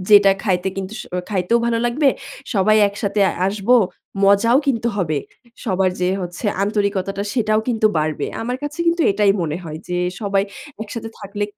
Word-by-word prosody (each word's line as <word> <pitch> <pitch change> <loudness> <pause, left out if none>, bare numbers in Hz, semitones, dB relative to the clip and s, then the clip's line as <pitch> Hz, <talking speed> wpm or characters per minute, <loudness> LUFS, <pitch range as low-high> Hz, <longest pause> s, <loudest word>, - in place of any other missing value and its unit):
যেটা 200 -2 +7
খাইতে 190 -3 0
কিন্তু 195 +2 -5
স - - -5 0.3
খাইতেও 195 +4 +2
ভালো 230 -1 +1
লাগবে। 275 +4 +2 0.5
সবাই 205 +2 +4
একসাথে 200 0 -2 0.3
আসব, 200 +2 -4 0.6
মজাও 220 +6 +5
কিন্তু 235 -3 +1
হবে। 155 -6 0 0.5
সবার 190 -4 +1
যে 180 - +2
হচ্ছে 175 +4 -5 0.2
আন্তরিকতাটা 200 -1 -1
সেটাও 215 -3 +2
কিন্তু 220 -2 +2
বাড়বে।" 155 0 -1 0.2
আমার 250 +2 -2
কাছে 290 +3 -5
কিন্তু 335 0 +3
এটাই 200 -1 +3
মনে 155 0 -2
হয় 155 -1 -6
যে 180 - -1 0.2
সবাই 200 -1 +1 0.4
একসাথে 225 +1 -6
থাকলে 205 -1 -3
200 Hz, 155 wpm, -20 LUFS, 190-225 Hz, 0.6 s, যেটা